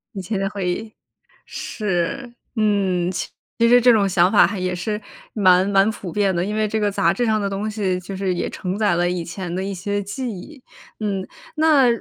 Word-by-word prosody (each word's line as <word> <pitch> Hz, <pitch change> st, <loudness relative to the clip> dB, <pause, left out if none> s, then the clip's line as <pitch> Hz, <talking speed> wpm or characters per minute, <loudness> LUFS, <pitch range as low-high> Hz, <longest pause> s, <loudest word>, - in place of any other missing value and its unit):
以 195 Hz, -, -3 dB
前 200 Hz, +2 st, -3 dB
的 195 Hz, 0 st, -1 dB
回 195 Hz, -3 st, -4 dB
忆， 215 Hz, +4 st, -4 dB, 0.5 s
是， 215 Hz, +6 st, -3 dB, 0.2 s
嗯。 195 Hz, -5 st, +1 dB, 0.5 s
其 230 Hz, -, +5 dB
实 245 Hz, +1 st, +6 dB
这 245 Hz, 0 st, +6 dB
种 205 Hz, -3 st, +3 dB
想 180 Hz, 0 st, +3 dB
法 210 Hz, -, +7 dB
还 205 Hz, -, -3 dB
也 180 Hz, 0 st, -1 dB
是 210 Hz, +4 st, -3 dB, 0.3 s
蛮 185 Hz, -2 st, +4 dB
蛮 195 Hz, +1 st, +4 dB
普 195 Hz, -5 st, -6 dB
遍 195 Hz, -2 st, +1 dB
的， 175 Hz, +2 st, 0 dB
因 210 Hz, +1 st, -3 dB
为 215 Hz, 0 st, +1 dB
这 220 Hz, +1 st, -1 dB
个 205 Hz, -1 st, +1 dB
杂 170 Hz, -3 st, +2 dB
志 240 Hz, +5 st, 0 dB
上 215 Hz, -2 st, +1 dB
的 200 Hz, -, -1 dB
东 205 Hz, +2 st, -3 dB
西， 190 Hz, -4 st, -1 dB
就 190 Hz, +2 st, -7 dB
是 190 Hz, -2 st, -1 dB
也 -, -, -2 dB
承 185 Hz, +1 st, -4 dB
载 205 Hz, -4 st, +2 dB
了 175 Hz, +1 st, +1 dB
以 180 Hz, -2 st, -2 dB
前 175 Hz, 0 st, -6 dB
的 190 Hz, -, -2 dB
一 195 Hz, 0 st, -3 dB
些 205 Hz, +2 st, -2 dB
记 240 Hz, +5 st, -4 dB
忆， 260 Hz, -, -10 dB, 0.4 s
嗯。 195 Hz, -3 st, -2 dB, 0.3 s
那 305 Hz, -5 st, +5 dB
200 Hz, 230 characters per minute, -21 LUFS, 185-215 Hz, 0.5 s, 法